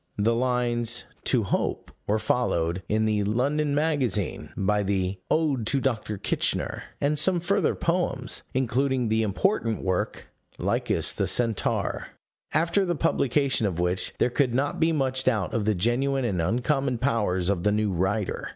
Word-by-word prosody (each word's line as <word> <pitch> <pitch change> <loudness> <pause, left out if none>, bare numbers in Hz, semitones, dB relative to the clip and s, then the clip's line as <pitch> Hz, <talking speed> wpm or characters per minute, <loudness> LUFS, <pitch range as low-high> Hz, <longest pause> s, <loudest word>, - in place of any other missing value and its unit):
The 110 +3 +2
lines 120 -1 0 0.2
To 125 -4 +2
Hope 100 - -2 0.2
were 105 - +2
followed, 90 -7 0
in 110 +1 +2
the 105 -1 +1
London 140 +8 0
Magazine, 145 - 0
by 105 +2 +1
the 95 -1 -1
Ode 145 -8 +1
to 140 +3 +3
Dr. 110 -5 -2
Kitchener - - -1
and 145 +1 +2
some 175 +3 +3
further 190 +1 +1
poems, 165 -7 -1
including 130 -1 +1
the 110 +1 +2
important 115 - 0
work, 95 -1 -2 0.3
Lycus - - +1
the - - -1
Centaur 115 -4 0 0.4
after 170 +5 +2
the 175 -2 0
publication 140 -5 +1
of 90 -3 -3
which, 90 +1 -1
there 125 - +2
could 125 -2 +1
not 140 +2 0
be 165 0 +3
much 130 -3 0
doubt 105 -8 +1
of 110 -3 0
the 110 -1 +2
genuine 125 +7 +1
and 95 -7 0
uncommon 125 - 0
powers 105 -8 0
of 95 -3 +1
the 105 - +2
new 105 -1 +1
writer. 95 +3 -1
120 Hz, 155 wpm, -26 LUFS, 105-140 Hz, 0.4 s, to